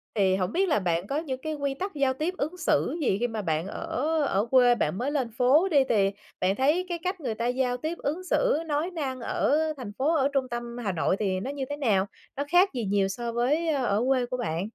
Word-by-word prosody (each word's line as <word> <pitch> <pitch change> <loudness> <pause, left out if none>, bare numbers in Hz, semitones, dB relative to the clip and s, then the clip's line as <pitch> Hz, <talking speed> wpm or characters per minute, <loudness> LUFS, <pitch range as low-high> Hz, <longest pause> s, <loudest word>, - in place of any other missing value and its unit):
thì 190 -2 +3
hổng 185 +1 -1
biết 380 0 +1
là 215 - +3
bạn 175 0 -1
có 280 - -1
những 265 -5 -4
cái 310 0 -3
quy 280 -1 -2
tắc 385 +7 -5
giao 270 -2 +2
tiếp 315 +7 -2
ứng 315 +6 -3
xử 345 - +1
gì 195 -8 +2
khi 245 - +1
mà 220 -2 -4
bạn 160 0 -1
ở 255 +6 -3 0.2
ở 200 -1 +1
quê 245 -2 +6
bạn 180 -3 -1
mới 270 +4 -1
lên 260 -6 -1
phố 280 +9 +4
đi, 285 -4 +5
thì 200 -3 +3 0.3
bạn 185 +2 +1
thấy 305 +8 +2
cái 340 -1 -2
cách 365 0 -2
người 235 -5 -2
ta 235 +2 -1
giao 250 0 0
tiếp, 315 +6 -4
ứng 320 +6 -3
xử, - - +2
nói 310 +4 -1
năng 270 -6 -3
ở 280 +4 +1 0.2
thành 230 -6 -6
phố, 305 +5 +2
ở 275 -2 +3
trung 260 -2 0
tâm 240 0 -5
Hà 200 - 0
Nội 180 +2 +1
thì 190 -3 0
nó 260 +8 -4
như 275 -2 -4
thế 290 - -3
nào? 205 -9 +2 0.3
Nó 285 - 0
khác 365 +3 +6
gì 240 -4 -2
nhiều 195 0 +2
so 235 +4 -4
với 290 +8 +1
ở 245 -7 +1
quê 255 -2 +2
của 250 +1 -4
bạn? 175 -5 -2
255 Hz, 250 wpm, -27 LUFS, 210-300 Hz, 0.3 s, quê